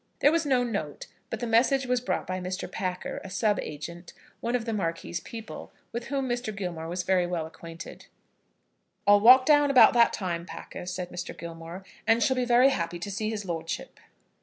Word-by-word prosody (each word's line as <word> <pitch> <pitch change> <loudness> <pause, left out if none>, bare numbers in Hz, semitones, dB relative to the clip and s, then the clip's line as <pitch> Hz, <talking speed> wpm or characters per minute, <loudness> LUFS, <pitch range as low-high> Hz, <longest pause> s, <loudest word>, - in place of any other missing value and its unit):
There 290 - +6
was 330 -2 +1
no 255 -3 +3
note, 200 -11 -4 0.2
but 225 - -5
the - - -1
message 250 +4 +3
was 250 -1 +1
brought 250 - -2
by 185 0 -3
Mr. 185 +1 -4
Packer, 180 -1 -4
a 195 - -8
sub 205 +2 +1
agent, 170 +4 -7 0.3
one 235 +1 -1
of 235 -2 -1
the 225 - -2
Marquis's 170 -3 -2
people, 225 +2 -9 0.2
with 235 +1 -4
whom 270 -1 -1
Mr. 240 -3 -2
Gilmore 170 -4 -4
was 180 +2 -3
very 180 -1 +2
well 175 -3 -2
acquainted. 165 +1 -10 1.0
"I'll 205 0 +7
walk 255 +4 +8
down 290 -1 +5
about 265 -3 +7
that 235 -1 +5
time, 170 -3 -3
Packer," 180 - -8
said 180 -1 -4
Mr. 175 - -6
Gilmore, 170 +2 -8 0.2
"and 225 0 +4
shall 260 - +2
be 250 -1 0
very 245 +2 +5
happy 175 -8 -2
to 190 +4 -5
see 215 +2 -2
his 210 -2 -4
lordship." 165 -2 -5
200 Hz, 195 wpm, -27 LUFS, 175-240 Hz, 1.0 s, walk